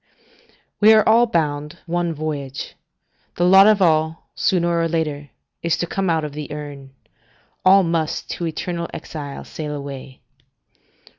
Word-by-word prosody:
["We 215 +1 +7
are 215 -1 +4
all 230 +2 +5
bound 150 -6 -1
one 175 0 -1
voyage; 145 -3 -5 0.6
the 175 - 0
lot 190 +2 +7
of 210 -3 +4
all, 160 -1 +1
sooner 170 -2 +1
or 165 - +1
later, 150 -3 -2 0.3
is 170 -1 0
to - - -1
come 190 +2 -2
out 160 -1 +1
of 150 -1 -5
the 150 0 -7
urn. 140 -2 -8 0.7
All 195 +1 +6
must 165 -2 -1
to 170 - -3
eternal 170 +1 -4
exile 145 -3 -7
sail 150 -2 -6
away." 140 -2 -8
160 Hz, 145 wpm, -21 LUFS, 150-175 Hz, 0.7 s, We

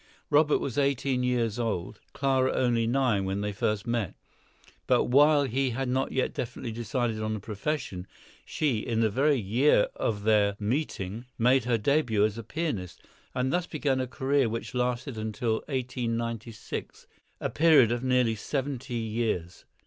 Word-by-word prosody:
Robert 150 0 +5
was 135 0 -2
eighteen 135 -2 +1
years 120 -3 0
old, 105 -6 -2
Clara 130 -1 +1
only 120 -3 +1
nine, 120 -5 +2
when 95 +1 -2
they 105 0 -2
first 105 +1 -1
met; 115 -6 -1 0.7
but - - +4
while 145 +3 +5
he 135 +1 0
had 130 +2 -2
not 130 +2 0
yet 130 - 0
definitely 120 -1 -4
decided 115 0 -2
on 110 0 -1
a - - -4
profession, 105 -2 -4 0.4
she, 140 -8 0
in 115 +1 -1
the 110 -2 +2
very 140 +4 +2
year 115 +4 +3
of 105 -3 -2
their 105 -2 +3
meeting, 110 -2 -2
made 125 +2 +3
her 120 -2 +2
début 115 -3 +2
as 105 -1 -1
a 115 - -6
pianist, 115 - -4 0.3
and 130 +1 0
thus 180 0 0
began 140 -4 0
a 130 - -1
career 135 0 +1
which 115 +2 -5
lasted 125 0 -2
until 110 +1 -1
1896, 115 -4 -4 0.3
a - - -2
period 150 -7 +5
of 120 +1 -1
nearly 125 -3 +2
seventy 135 +2 -3
years! 110 -6 -2
120 Hz, 155 wpm, -28 LUFS, 110-135 Hz, 0.7 s, Robert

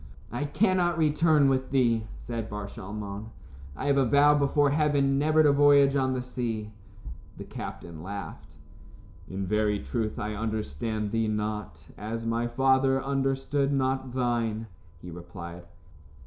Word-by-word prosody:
"I 130 +6 -2
cannot 175 +1 +2
return 150 -2 +4
with 130 -1 +1
thee," 115 -5 +2
said 115 -2 -5
Bar 105 -1 -5
Shalmon. 100 +1 -7 0.5
"I - - -5
have 140 -1 +3
a 135 - +3
vow 145 +4 +5
before 145 0 +2
heaven 140 -2 +2
never 155 +1 +4
to 150 - +5
voyage 140 -1 +5
on 130 -1 +1
the 125 -1 -2
sea." 115 -4 -4 0.7
The - - -7
captain 80 -2 -8
laughed. 100 +3 -8 0.7
"In 95 +1 -3
very 105 +1 +1
truth, 110 +1 -3
I 105 +1 -3
understand 110 -1 -3
thee 115 0 +1
not, 105 -8 -4
as 115 +2 -4
my 115 +1 0
father 135 +2 +3
understood 135 +1 0
not 130 -2 -1
thine," 115 -3 0 0.4
he 90 - -8
replied. 85 0 -9
120 Hz, 140 wpm, -27 LUFS, 105-140 Hz, 0.7 s, vow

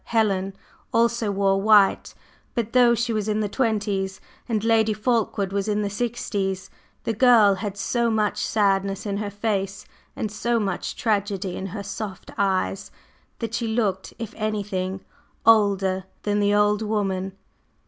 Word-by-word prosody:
Helen 195 -4 0 0.4
also 230 -1 +2
wore 195 -1 +2
white, 205 -1 +4 0.4
but 230 -2 -2
though 245 -1 +6
she 235 0 -1
was 215 -1 -1
in 215 0 +1
the 210 - 0
twenties 200 -4 -1 0.3
and 215 -2 0
Lady 225 -1 +3
Fulkeward 210 -3 0
was 200 0 -1
in 210 0 0
the 200 - -2
sixties, 205 -4 -2 0.3
the 225 - -1
girl 225 -3 +6
had 200 +1 -4
so 235 +3 0
much 215 -2 0
sadness 195 -2 +1
in 200 -1 -2
her 205 0 -3
face 200 -1 -2 0.3
and 215 - -3
so 235 +2 0
much 195 -4 -3
tragedy 200 -4 -1
in 195 - -4
her 200 +2 -6
soft 200 0 -6
eyes 195 -1 0 0.5
that 230 -1 -5
she 235 -1 -1
looked, 215 -4 -1
if 230 0 -6
anything, 200 -3 -2 0.4
older 200 -4 +4 0.2
than 205 0 +1
the 205 0 +2
old 210 0 +3
woman. 195 -3 -1
205 Hz, 150 wpm, -24 LUFS, 195-220 Hz, 0.5 s, though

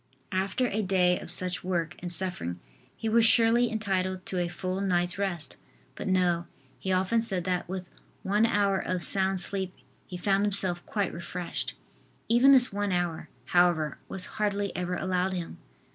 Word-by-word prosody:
After 190 +6 0
a 220 -2 -1
day 180 -2 +2
of - - -9
such 180 +1 -1
work 175 -2 -2
and 175 0 -6
suffering 175 - -2 0.4
he 225 - -4
was 225 +1 +4
surely 230 +1 +5
entitled 185 -4 -2
to 185 - -2
a 175 - 0
full 185 +2 -4
night's 180 -1 0
rest. 175 -6 -2 0.4
But - - -6
no, 175 -2 +1 0.3
he 190 - -3
often 190 +5 +2
said 195 -6 -1
that 180 -1 -2
with 185 -1 -5 0.4
one 210 +4 +2
hour 200 -3 +2
of 180 -1 -3
sound 190 -1 +1
sleep 190 -2 +1 0.3
he 180 - -6
found 195 +2 +1
himself 190 -4 0
quite 200 -4 -1
refreshed. 170 +1 -5 0.5
Even 240 +4 +6
this 250 -5 +7
one 205 0 -1
hour, 175 -4 -2 0.2
however, 170 -2 +2
was 190 - -6
hardly 205 -1 -2
ever 180 0 -2
allowed 185 +1 -1
him. 175 -1 -5
185 Hz, 165 wpm, -28 LUFS, 180-200 Hz, 0.5 s, this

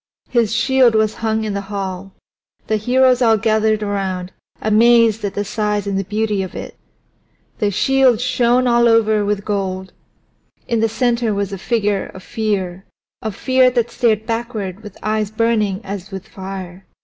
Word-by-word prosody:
His 235 -4 +2
shield 255 -1 +3
was 215 0 +2
hung 220 -1 0
in 215 -2 -3
the 200 - -2
hall; 195 -1 -5 0.5
the 215 - 0
heroes 255 +3 +3
all 225 -2 +4
gathered 215 0 +1
around, 190 -3 -3 0.3
amazed 225 0 +4
at 200 - -3
the 205 - -2
size 210 -1 -1
and 200 -1 -2
the 195 - 0
beauty 210 0 -1
of 185 - -6
it. - - -7 0.8
The 210 - +2
shield 260 +3 +3
shone 250 0 +2
all 235 -1 +4
over 220 -2 +3
with 205 0 -2
gold. 190 -2 -3 0.7
In 235 -3 0
its 225 - +1
center 235 -2 0
was 200 -1 -2
the 195 - -5
figure 210 -3 0
of 190 - -10
Fear 195 -4 -2 0.4
of 220 -3 -4
Fear 260 +1 +3
that 240 -2 -1
stared 220 -3 +1
backward 225 -4 -4
with 210 -2 -11
eyes 215 -1 0
burning 215 -3 0
as 195 -1 -6
with 190 -2 -8
fire. 190 -1 -8
215 Hz, 165 wpm, -18 LUFS, 200-230 Hz, 0.8 s, all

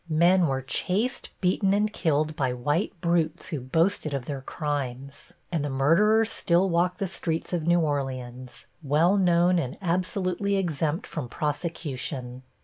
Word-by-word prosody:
Men 170 +3 +4
were 135 -1 -1
chased, 210 - -1
beaten 190 +1 +2
and 210 +1 +1
killed 155 -2 0
by 130 -3 0
white 145 +9 -1
brutes, 170 -1 0
who 155 -5 -3
boasted 155 +3 +1
of 130 -3 -4
their 140 -1 -5
crimes, 140 -2 -5 0.2
and 165 -4 -1
the 145 - -2
murderers 210 +12 +3
still 175 +3 +3
walk 175 +2 +1
the 195 - -1
streets 165 -2 -3
of 165 -2 -1
New 175 0 +4
Orleans, 130 -4 -4 0.2
well 160 +6 +3
known 180 -2 +3
and 130 -5 -4
absolutely 185 +2 -1
exempt 165 -2 -1
from 145 -7 -5
prosecution. 140 -4 -4
160 Hz, 145 wpm, -26 LUFS, 140-180 Hz, 0.2 s, Men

